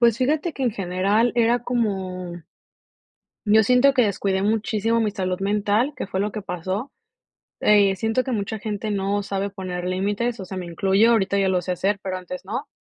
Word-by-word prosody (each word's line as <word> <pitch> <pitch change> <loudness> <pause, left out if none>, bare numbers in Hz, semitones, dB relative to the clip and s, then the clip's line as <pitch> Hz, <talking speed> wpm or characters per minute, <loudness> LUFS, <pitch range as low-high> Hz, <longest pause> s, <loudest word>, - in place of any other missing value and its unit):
Pues, 235 0 +4
fíjate 300 +6 +1
que 270 - -3
en 240 - +1
general 200 +4 +1
era 235 +1 +3
como 185 -7 -2 1.0
Yo 220 +1 +6
siento 250 +4 +4
que 255 - +4
descuidé 195 -1 0
muchísimo 220 +2 +1
mi 215 -2 +1
salud 185 -3 -2
mental, 210 +7 +1
que 255 - -4
fue 190 -1 -2
lo 210 +1 0
que 215 - -6
pasó. 190 - -4 0.7
Eh, 205 -2 +4
siento 225 +6 0
que 260 - -4
mucha 215 0 -2
gente 215 0 -4
no 200 0 0
sabe 200 0 -3
poner 185 -2 -5
límites, 205 +6 -1
o 190 - -5
sea, 190 +1 -6
me 180 - -4
incluyo, 195 +6 +3
ahorita 200 -3 +2
ya 195 -1 +2
lo 180 -1 +1
sé 180 +1 -2
hacer, 195 +3 0
pero 185 -1 -3
antes 180 +1 -7
no. 240 +9 -4
205 Hz, 190 wpm, -23 LUFS, 190-225 Hz, 1.0 s, Yo